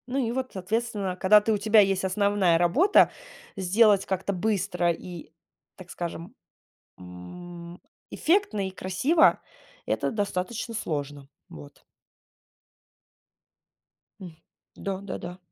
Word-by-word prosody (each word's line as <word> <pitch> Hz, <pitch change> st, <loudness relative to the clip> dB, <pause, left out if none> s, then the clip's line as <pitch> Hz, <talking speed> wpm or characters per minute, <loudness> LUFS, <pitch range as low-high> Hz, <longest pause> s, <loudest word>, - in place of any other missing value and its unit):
Ну 260 Hz, +2 st, -3 dB
и 240 Hz, -4 st, 0 dB
вот, 255 Hz, +1 st, -3 dB
соответственно, 200 Hz, 0 st, -2 dB
когда 200 Hz, +3 st, +5 dB
ты, 220 Hz, -, -1 dB
у -, -, +1 dB
тебя 215 Hz, +2 st, +4 dB
есть 195 Hz, -2 st, +3 dB
основная 190 Hz, -2 st, +2 dB
работа, 185 Hz, -, +4 dB, 0.4 s
сделать 200 Hz, +1 st, +3 dB
как-то 190 Hz, +1 st, -2 dB
быстро 185 Hz, -3 st, 0 dB
и, 170 Hz, -2 st, -9 dB, 0.4 s
так 185 Hz, -1 st, -13 dB
скажем, 170 Hz, +4 st, -6 dB, 0.7 s
м, 170 Hz, -, -11 dB, 0.3 s
эффектно 320 Hz, -, +1 dB
и -, -, -5 dB
красиво, 195 Hz, -, +2 dB, 0.5 s
это -, -, -1 dB
достаточно 210 Hz, +2 st, -3 dB
сложно. 145 Hz, -7 st, -4 dB, 0.2 s
Вот. 75 Hz, -2 st, -13 dB, 2.4 s
М, 175 Hz, -4 st, -10 dB, 0.4 s
да, 195 Hz, -1 st, -5 dB
да-да. 180 Hz, -2 st, -7 dB
190 Hz, 110 wpm, -26 LUFS, 175-215 Hz, 2.4 s, когда